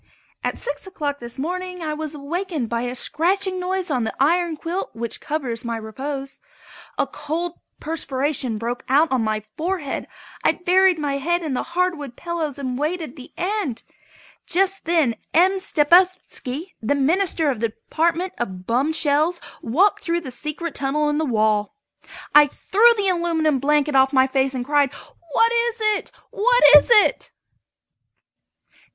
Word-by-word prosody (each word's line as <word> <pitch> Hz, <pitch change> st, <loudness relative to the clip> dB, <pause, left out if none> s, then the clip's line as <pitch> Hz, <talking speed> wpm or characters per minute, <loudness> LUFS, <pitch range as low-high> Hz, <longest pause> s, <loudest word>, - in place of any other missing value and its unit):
At -, -, -2 dB
six 285 Hz, +5 st, -5 dB
o'clock 290 Hz, -6 st, -4 dB
this 235 Hz, 0 st, -10 dB
morning 360 Hz, +4 st, -4 dB
I 305 Hz, -1 st, -2 dB
was 305 Hz, 0 st, -5 dB
awakened 300 Hz, -, -3 dB
by 235 Hz, 0 st, -1 dB
a 245 Hz, +1 st, -3 dB
scratching 370 Hz, +8 st, 0 dB
noise 370 Hz, -1 st, -2 dB
on 250 Hz, -4 st, 0 dB
the 220 Hz, -, -3 dB
iron 335 Hz, +3 st, +2 dB
quilt 345 Hz, +5 st, -3 dB
which 235 Hz, 0 st, -4 dB
covers 265 Hz, -6 st, -3 dB
my 235 Hz, -1 st, -3 dB
repose. 270 Hz, +5 st, -6 dB, 0.6 s
A -, -, +2 dB
cold 335 Hz, +3 st, -4 dB, 0.2 s
perspiration 280 Hz, -5 st, -2 dB
broke 235 Hz, +3 st, -4 dB
out 295 Hz, +4 st, +4 dB
on 255 Hz, -3 st, +1 dB
my 215 Hz, -1 st, -1 dB
forehead. 330 Hz, -4 st, -3 dB, 0.4 s
I -, -, +4 dB
buried 365 Hz, 0 st, +3 dB
my 285 Hz, -2 st, -2 dB
head 345 Hz, +5 st, 0 dB
in 305 Hz, -4 st, -3 dB
the 250 Hz, -, -1 dB, 0.2 s
hardwood 325 Hz, -9 st, -1 dB
pillows 330 Hz, -5 st, -3 dB
and 260 Hz, -2 st, -4 dB
waited 310 Hz, -2 st, -3 dB
the 260 Hz, -4 st, -12 dB
end. 365 Hz, -, -2 dB, 0.6 s
Just 390 Hz, +2 st, +2 dB
then 320 Hz, -8 st, +2 dB, 0.2 s
M. 375 Hz, +3 st, +4 dB
Stepupski, 345 Hz, -2 st, +1 dB
the 235 Hz, +6 st, +1 dB
Minister 320 Hz, +1 st, +1 dB
of 245 Hz, -, -5 dB
the 230 Hz, -, +1 dB
Department 340 Hz, -, -1 dB
of 185 Hz, -6 st, -5 dB
Bum 255 Hz, +8 st, +1 dB
Shells, 310 Hz, +3 st, +1 dB, 0.2 s
walked 355 Hz, -, +2 dB
in -, -, -12 dB
through 340 Hz, -1 st, 0 dB
the 265 Hz, -6 st, -7 dB
secret 300 Hz, +5 st, -5 dB
tunnel 295 Hz, +2 st, 0 dB
in 295 Hz, -, 0 dB
the 315 Hz, -, 0 dB
wall. 215 Hz, -, +1 dB, 0.6 s
I 295 Hz, 0 st, +8 dB
threw 440 Hz, -, +3 dB
the 400 Hz, -2 st, +2 dB
aluminum 330 Hz, -5 st, +1 dB
blanket 295 Hz, +1 st, +1 dB
off 265 Hz, 0 st, +5 dB
my 260 Hz, -2 st, +4 dB
face 265 Hz, 0 st, 0 dB
and 245 Hz, -1 st, -3 dB
cried: 290 Hz, -1 st, +2 dB, 0.4 s
"What 460 Hz, 0 st, +4 dB
is 470 Hz, 0 st, +1 dB
it? 430 Hz, -1 st, 0 dB, 0.2 s
What -, -, +3 dB
is 295 Hz, -, +7 dB
it?" 470 Hz, +2 st, +4 dB
300 Hz, 160 wpm, -22 LUFS, 265-355 Hz, 0.6 s, I